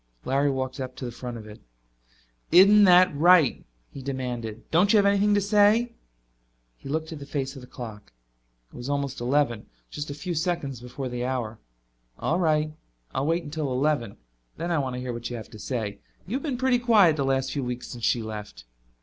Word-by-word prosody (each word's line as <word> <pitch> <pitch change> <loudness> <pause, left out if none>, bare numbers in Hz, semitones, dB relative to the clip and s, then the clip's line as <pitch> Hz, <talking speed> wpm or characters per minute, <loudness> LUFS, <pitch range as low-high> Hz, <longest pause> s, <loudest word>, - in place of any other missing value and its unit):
Larry 140 +2 +2
walked 130 -1 -3
up 130 -1 -6
in 120 - -4
front 120 0 -7
of 110 - -10
it. 105 0 -12 0.9
"Isn't 200 +4 +8
that 180 -2 +6
right?" 165 -2 +5 0.3
he 140 - -9
demanded. 125 -5 -4
"Don't 180 +5 +4
you 220 - +6
have 200 - +4
anything 200 +1 +3
to - - +4
say?" 210 +4 +3 0.8
He 135 - -11
looked 160 +2 -2
at 155 - -8
the 140 - -8
face 135 -2 -3
of 135 - -9
the 125 - -12
clock. 110 - -9 0.6
It - - -14
was 120 +2 -6
almost 140 -2 -2
eleven, 120 -3 0 0.2
just 150 0 -5
a 145 - -5
few 175 +4 -4
seconds 160 - -2
before 125 +2 -6
the 120 -1 -4
hour. 120 -4 -3 0.6
"All 170 - 0
right. 155 -3 +1 0.4
I'll 135 +2 -1
wait 165 +2 +1
until 150 -2 -3
eleven. 130 -5 0 0.4
Then 170 +2 -3
I 165 - +2
want 130 -2 -2
to - - -4
hear 125 -1 -4
what 120 0 -5
you 120 - -5
have 110 - -9
to 110 - -11
say. 110 -4 -4 0.3
You've 255 +8 -3
been 275 -4 -2
pretty 255 -1 +2
quiet 215 -9 +5
the 140 - -1
last 135 0 0
few 140 - -2
weeks 125 0 -4
since 120 -2 -8
she 115 0 +2
left." 105 - -8
140 Hz, 200 wpm, -26 LUFS, 125-175 Hz, 0.9 s, Isn't